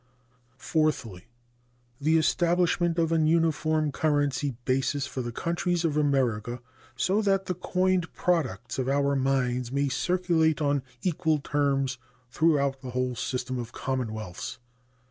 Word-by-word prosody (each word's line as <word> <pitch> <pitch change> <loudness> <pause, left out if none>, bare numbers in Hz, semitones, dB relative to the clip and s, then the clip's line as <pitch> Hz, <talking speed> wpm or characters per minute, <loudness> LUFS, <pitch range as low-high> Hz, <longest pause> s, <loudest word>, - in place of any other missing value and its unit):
Fourthly. 130 - -1 0.7
The 155 +3 +3
establishment 175 +1 +2
of 165 -1 +1
an 160 -2 +3
uniform 155 -2 +2
currency 145 -2 0
basis 135 +2 0
for 130 -1 -4
the 120 -1 -4
countries 170 +5 -1
of 155 -3 0
America, 125 -6 +1 0.4
so 190 - +1
that 195 -2 +1
the 180 - -1
coined 180 0 0
products 130 - -1
of 130 0 0
our 140 0 +2
mines 125 -2 0
may 140 +1 +1
circulate 165 +1 +1
on 145 -2 +1 0.2
equal 160 -3 +1
terms 140 -3 0 0.3
throughout 140 -4 +2
the 130 - -7
whole 125 0 -1
system 125 +1 -3
of 120 -1 -6
commonwealths. 110 -8 -4
145 Hz, 125 wpm, -27 LUFS, 130-165 Hz, 0.7 s, The